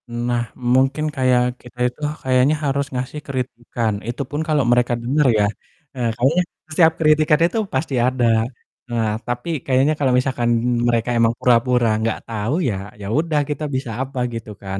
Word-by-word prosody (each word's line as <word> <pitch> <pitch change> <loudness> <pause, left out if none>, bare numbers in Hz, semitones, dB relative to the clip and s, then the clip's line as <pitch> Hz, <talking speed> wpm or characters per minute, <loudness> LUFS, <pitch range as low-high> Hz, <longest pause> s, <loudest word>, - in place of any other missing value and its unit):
Nah 120 0 -2
mungkin 130 +4 +2
kayak 125 -1 +1
kita 125 0 -15
itu 150 - -21 0.2
kayaknya 130 +3 +3
harus 140 0 0
ngasih 130 +4 -4
kritikan, 120 -4 -3
itu 120 +3 -3
pun 150 +1 -2
kalau 150 -3 +2
mereka 120 0 +3
denger 135 +4 +2
ya. 105 - +4 0.5
Eee, 120 -2 0
kayaknya 145 +9 +3 0.3
setiap 160 0 +4
kritikan 155 -1 +4
itu 175 +6 -1 0.2
pasti 145 -4 -1
ada. 125 0 +1 0.6
Nah 115 -2 0 0.2
tapi 125 +6 -3 0.2
kayaknya 135 +3 +3
kalau 140 -3 +2
misalkan 125 -2 0 0.4
mereka 115 0 +1
emang 115 0 +3
pura-pura 125 0 +3
nggak 110 0 -1
tahu 110 +2 -2 0.2
ya, 105 - -1 0.3
ya 100 - -6
udah 155 +1 +1
kita 150 +1 -3
bisa 130 -3 -3
apa 135 0 -4
gitu 115 -1 -6
kan. 95 0 -4
125 Hz, 160 wpm, -20 LUFS, 120-140 Hz, 0.6 s, ya